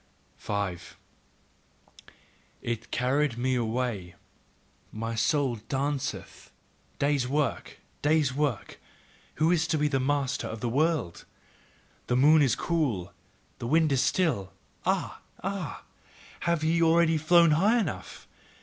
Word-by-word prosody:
5. 100 Hz, -4 st, -4 dB, 1.7 s
It 115 Hz, -1 st, -4 dB
carrieth 130 Hz, 0 st, 0 dB
me 130 Hz, +2 st, 0 dB
away, 115 Hz, -6 st, -2 dB, 0.8 s
my 115 Hz, +1 st, -4 dB
soul 125 Hz, +2 st, +1 dB
danceth. 140 Hz, 0 st, -3 dB, 0.5 s
Day's 140 Hz, -3 st, +1 dB
work! 140 Hz, -1 st, -2 dB, 0.2 s
Day's 150 Hz, -3 st, +2 dB
work! 140 Hz, -7 st, -2 dB, 0.6 s
Who 160 Hz, +2 st, +2 dB
is 160 Hz, -2 st, +2 dB
to 160 Hz, -, +1 dB
be 150 Hz, 0 st, +2 dB
master 140 Hz, 0 st, -1 dB
of 110 Hz, -, -6 dB
the 120 Hz, -, -2 dB
world? 145 Hz, -, 0 dB, 0.8 s
The 125 Hz, -, +1 dB
moon 150 Hz, +4 st, +6 dB
is 135 Hz, -6 st, +3 dB
cool, 135 Hz, -, -1 dB, 0.5 s
the 115 Hz, -, -4 dB
wind 160 Hz, +2 st, +3 dB
is 135 Hz, -2 st, +3 dB
still. 120 Hz, -, 0 dB, 0.3 s
Ah! -, -, -1 dB, 0.2 s
Ah! 195 Hz, -4 st, -4 dB, 0.6 s
Have 170 Hz, -2 st, 0 dB
ye 165 Hz, +1 st, +2 dB
already 165 Hz, -1 st, +4 dB
flown 170 Hz, +1 st, +5 dB
high 200 Hz, +10 st, +3 dB
enough? 150 Hz, -, -4 dB
140 Hz, 115 wpm, -28 LUFS, 120-160 Hz, 1.7 s, moon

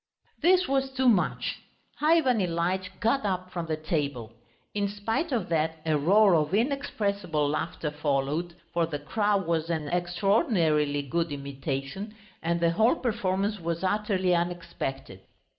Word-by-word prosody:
This 365 Hz, +1 st, +4 dB
was 270 Hz, 0 st, +1 dB
too 260 Hz, -1 st, 0 dB
much. 205 Hz, -7 st, +2 dB, 0.4 s
Ivan 300 Hz, -6 st, +4 dB
Ilyitch 180 Hz, +1 st, -1 dB
got 230 Hz, +4 st, +1 dB
up 185 Hz, -2 st, -2 dB
from 170 Hz, -2 st, -4 dB
the 155 Hz, -1 st, -1 dB
table. 140 Hz, -8 st, -2 dB, 0.4 s
In 205 Hz, -1 st, 0 dB
spite 225 Hz, -, -2 dB
of 240 Hz, -4 st, 0 dB
that, 160 Hz, 0 st, 0 dB
a 155 Hz, -1 st, +2 dB
roar 195 Hz, +7 st, +5 dB
of 155 Hz, +2 st, +2 dB
inexpressible 205 Hz, -, 0 dB
laughter 150 Hz, +1 st, -2 dB
followed, 150 Hz, +3 st, -1 dB, 0.2 s
for 170 Hz, -1 st, +1 dB
the 155 Hz, -3 st, -3 dB
crow 205 Hz, +8 st, +1 dB
was 165 Hz, -3 st, -1 dB
an 155 Hz, -3 st, -2 dB
extraordinarily 175 Hz, -, +1 dB
good 165 Hz, +3 st, -1 dB
imitation, 140 Hz, +8 st, -5 dB, 0.3 s
and 170 Hz, +1 st, 0 dB
the 170 Hz, 0 st, +3 dB
whole 220 Hz, -, +3 dB
performance 205 Hz, -, -1 dB
was 170 Hz, +1 st, -3 dB
utterly 190 Hz, -2 st, +1 dB
unexpected. 170 Hz, -, -3 dB
175 Hz, 140 wpm, -27 LUFS, 155-210 Hz, 0.4 s, roar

